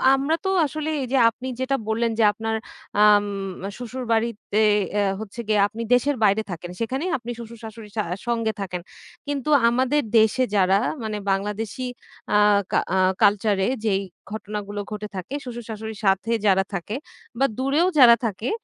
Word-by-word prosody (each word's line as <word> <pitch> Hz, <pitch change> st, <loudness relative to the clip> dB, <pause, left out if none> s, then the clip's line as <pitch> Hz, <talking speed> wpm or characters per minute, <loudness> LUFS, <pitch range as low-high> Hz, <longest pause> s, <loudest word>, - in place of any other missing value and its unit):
আমরা 280 Hz, +4 st, +1 dB
তো -, -, +1 dB, 0.2 s
আসলে 310 Hz, +1 st, -3 dB
এই 255 Hz, -, -3 dB
যে -, -, +4 dB
আপনি 255 Hz, +3 st, -8 dB
যেটা 260 Hz, +1 st, 0 dB
বললেন 230 Hz, +1 st, +1 dB
যে -, -, +5 dB
আপনার 225 Hz, +1 st, -2 dB, 0.5 s
আম 205 Hz, -1 st, +6 dB, 0.5 s
শ্বশুর 250 Hz, +1 st, -6 dB
বাড়িতে 225 Hz, -2 st, 0 dB, 0.4 s
এ -, -, +3 dB, 0.2 s
হচ্ছে 220 Hz, +2 st, -8 dB
গিয়ে 215 Hz, -1 st, +2 dB
আপনি 225 Hz, +3 st, -8 dB
দেশের 275 Hz, +3 st, +3 dB
বাইরে 205 Hz, +1 st, +4 dB
থাকেন। 175 Hz, +1 st, -6 dB
সেখানেই 265 Hz, +10 st, -2 dB
আপনি 240 Hz, 0 st, -7 dB
শ্বশুর-শাশুড়ির 225 Hz, -2 st, -10 dB
সা 210 Hz, -, +2 dB, 0.2 s
সঙ্গে 230 Hz, -2 st, 0 dB
থাকেন। 180 Hz, -2 st, -4 dB, 0.5 s
কিন্তু 290 Hz, 0 st, -2 dB, 0.2 s
আমাদের 260 Hz, +5 st, +2 dB, 0.2 s
দেশে 220 Hz, +4 st, +3 dB
যারা, 190 Hz, 0 st, +4 dB, 0.3 s
মানে 215 Hz, -1 st, -3 dB
বাংলাদেশী 210 Hz, +5 st, -2 dB, 0.5 s
আ -, -, +6 dB, 0.3 s
কা -, -, +3 dB, 0.2 s
আ -, -, +3 dB, 0.3 s
কালচার 205 Hz, 0 st, +3 dB
এ -, -, +1 dB, 0.2 s
যেই 195 Hz, -2 st, +2 dB, 0.3 s
ঘটনাগুলো 210 Hz, -1 st, -5 dB
ঘটে 210 Hz, 0 st, -4 dB
থাকে, 185 Hz, +9 st, -6 dB
শ্বশুর-শাশুড়ির 220 Hz, -3 st, -7 dB
সাথে 195 Hz, +4 st, +2 dB
যারা 195 Hz, -1 st, +4 dB
থাকে 195 Hz, +5 st, -3 dB, 0.4 s
বা 275 Hz, -, +4 dB
দূরেও 280 Hz, +7 st, +2 dB
যারা 235 Hz, -2 st, +9 dB
থাকে 220 Hz, +2 st, -2 dB
220 Hz, 160 wpm, -23 LUFS, 205-250 Hz, 0.5 s, যারা